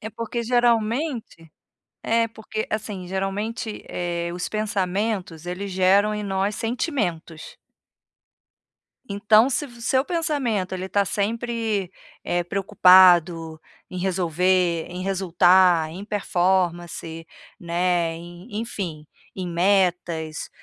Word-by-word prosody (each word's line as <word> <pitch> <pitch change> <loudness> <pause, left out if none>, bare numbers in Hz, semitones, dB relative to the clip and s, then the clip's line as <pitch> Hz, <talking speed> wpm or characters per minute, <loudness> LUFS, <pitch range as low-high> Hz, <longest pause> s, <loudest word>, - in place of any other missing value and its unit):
É 220 - -6
porque 230 +2 -4
geralmente 235 - 0 0.6
é 230 0 +2
porque, 220 -1 -6
assim, 210 -4 -4
geralmente, 205 +4 -3
eh, 170 -1 -3
os 180 0 -4
pensamentos, 200 -4 -2
eles 190 +3 -5
geram 190 +3 +3
em 210 - -3
nós 195 +1 -1
sentimentos. 220 - -3 1.5
Então 215 +4 +4
se 290 +3 -1
vo 240 -3 -15
o - - -14
seu 260 +2 +2
pensamento 280 - -1
ele 185 +1 -5
tá 200 +1 +2
sempre, 220 -1 -2 0.3
eh, 175 0 0
preocupado 180 -4 +4 0.3
em 185 - -6
resolver, 180 -1 +1
em 180 +1 -6
resultar, 180 -3 +3
em 180 +5 -8
performance, 175 -4 -1 0.3
né, 170 -1 0
em 175 +6 -9
enfim, 175 -9 -5 0.3
em 185 - -4
metas, 175 -3 0
190 Hz, 110 wpm, -23 LUFS, 175-215 Hz, 1.5 s, Então